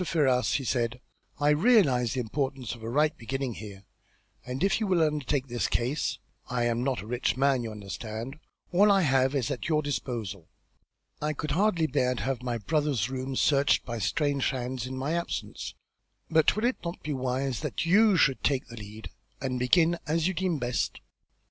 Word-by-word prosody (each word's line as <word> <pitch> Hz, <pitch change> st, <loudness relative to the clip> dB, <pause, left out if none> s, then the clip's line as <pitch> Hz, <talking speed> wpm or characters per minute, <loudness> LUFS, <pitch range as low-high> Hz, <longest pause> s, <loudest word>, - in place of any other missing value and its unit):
Ferrars," 135 Hz, -7 st, +2 dB
he 140 Hz, -, 0 dB
said, 120 Hz, -1 st, -1 dB, 0.4 s
"I 145 Hz, 0 st, +3 dB
realise 150 Hz, -, +4 dB
the 130 Hz, -, 0 dB
importance 130 Hz, +1 st, -3 dB
of 120 Hz, -, -11 dB
a 110 Hz, -, -5 dB
right 150 Hz, +5 st, +2 dB
beginning 130 Hz, +1 st, -3 dB
here, 100 Hz, -2 st, -9 dB, 0.6 s
and 125 Hz, +6 st, -4 dB
if 195 Hz, -, +3 dB
you 215 Hz, -, -1 dB
will 180 Hz, -4 st, +3 dB
undertake 150 Hz, -3 st, 0 dB
this 120 Hz, -2 st, -1 dB
case 120 Hz, -1 st, -1 dB, 0.3 s
I 125 Hz, -1 st, 0 dB
am 120 Hz, 0 st, 0 dB
not 130 Hz, -1 st, 0 dB
a -, -, -10 dB
rich 125 Hz, +2 st, -1 dB
man, 135 Hz, -1 st, +3 dB
you 115 Hz, -, -4 dB
understand 110 Hz, +5 st, -6 dB, 0.3 s
all 200 Hz, +4 st, +5 dB
I 195 Hz, -1 st, +5 dB
have 135 Hz, -3 st, +2 dB
is 130 Hz, -7 st, 0 dB
at -, -, -3 dB
your 155 Hz, -1 st, +2 dB
disposal. 115 Hz, -, -4 dB, 0.7 s
I 150 Hz, +1 st, 0 dB
could 150 Hz, +1 st, -4 dB
hardly 180 Hz, -3 st, +2 dB
bear 125 Hz, -3 st, +1 dB
to -, -, -4 dB
have 130 Hz, -2 st, -1 dB
my 120 Hz, -2 st, -2 dB
brother's 130 Hz, +1 st, 0 dB
rooms 130 Hz, 0 st, -3 dB
searched 140 Hz, -1 st, +3 dB
by 120 Hz, -1 st, -4 dB
strange 145 Hz, +2 st, +1 dB
hands 125 Hz, -1 st, -3 dB
in 130 Hz, 0 st, -5 dB
my 140 Hz, +5 st, -1 dB
absence, 170 Hz, 0 st, -4 dB, 0.6 s
but 160 Hz, -1 st, +4 dB
will 215 Hz, +2 st, 0 dB
it 255 Hz, -, +1 dB
not 170 Hz, 0 st, -5 dB
be 150 Hz, -, -2 dB
wise 130 Hz, 0 st, -1 dB
that -, -, -3 dB
you 200 Hz, +3 st, +5 dB
should 135 Hz, -4 st, +3 dB
take 135 Hz, -2 st, +1 dB
the 115 Hz, -, -9 dB
lead, 105 Hz, +1 st, -9 dB, 0.3 s
and 130 Hz, -1 st, -2 dB
begin 165 Hz, +7 st, +3 dB
as 160 Hz, +2 st, +1 dB
you 190 Hz, -, 0 dB
deem 185 Hz, -3 st, 0 dB
best?" 125 Hz, -2 st, -1 dB
135 Hz, 190 wpm, -28 LUFS, 120-155 Hz, 0.7 s, all